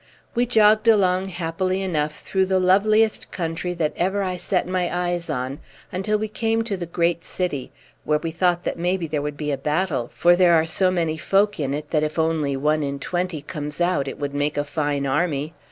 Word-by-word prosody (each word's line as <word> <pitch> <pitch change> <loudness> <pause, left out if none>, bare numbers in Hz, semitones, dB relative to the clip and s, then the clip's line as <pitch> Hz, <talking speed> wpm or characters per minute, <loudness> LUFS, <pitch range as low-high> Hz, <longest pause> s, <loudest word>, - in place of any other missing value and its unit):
We 240 +1 +1
jogged 215 -1 +4
along 190 -4 +4
happily 185 +2 -2
enough 150 -5 -2
through 190 -1 0
the 190 0 +2
loveliest 215 +4 +3
country 175 +1 -3
that 160 -3 -1
ever 195 +3 0
I 185 -1 -2
set 180 0 -1
my 180 -1 0
eyes 175 -1 -2
on, 130 -1 -3 0.3
until 200 +3 0
we 215 +1 -2
came 225 +1 0
to 220 -3 -2
the 175 -2 -5
great 170 0 0
city, 160 -8 -3 0.3
where 150 - +2
we 160 +2 -4
thought 175 +1 +1
that - - -3
maybe 180 0 0
there 150 -2 -2
would 145 0 -4
be 150 0 -2
a 140 - -2
battle, 150 -5 -1
for 175 0 +4
there 175 -1 +5
are 160 0 +3
so 185 +3 +2
many 165 -3 0
folk 200 +4 +1
in 140 -1 -1
it 150 0 -6
that 155 - +2
if 155 +1 -2
only 160 -4 +1
one 150 +3 +1
in 140 -1 -2
twenty 175 0 -3
comes 150 -1 -6
out 175 -5 +1
it - - -5
would 145 -1 -4
make 145 +1 -1
a 145 - +1
fine 145 -1 -1
army. 150 +1 0
170 Hz, 210 wpm, -23 LUFS, 150-185 Hz, 0.3 s, there